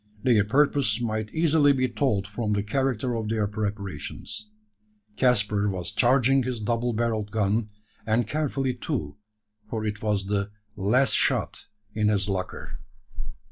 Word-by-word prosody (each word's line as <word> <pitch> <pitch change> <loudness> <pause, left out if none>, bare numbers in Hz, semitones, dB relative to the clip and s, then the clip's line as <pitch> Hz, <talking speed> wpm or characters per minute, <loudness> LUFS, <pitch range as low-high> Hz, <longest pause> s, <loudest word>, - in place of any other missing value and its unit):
Their 115 -5 +4
purpose 135 -1 +2
might 110 -2 -2
easily 160 -3 +4
be 130 -1 +1
told 120 -6 0
from 105 0 -2
the 100 -1 0
character 130 +1 -1
of 110 -2 -3
their 110 -1 +1
preparations. 105 0 -5 0.7
Caspar 105 -5 +2
was 90 -2 -3
charging 135 +2 +4
his 125 -2 -3
double 115 +2 -1
barrelled 110 -2 -1
gun; 105 +1 0 0.3
and 110 +2 +1
carefully 135 -1 -1
too 125 -2 -4 0.5
for 110 -1 -3
it 105 0 -3
was 105 -3 0
the 100 0 -1 0.3
"last 115 +7 +2
shot - - +1 0.3
in 105 -1 +1
his 100 -1 +1
locker." 95 -2 -4
110 Hz, 140 wpm, -26 LUFS, 105-125 Hz, 0.7 s, Their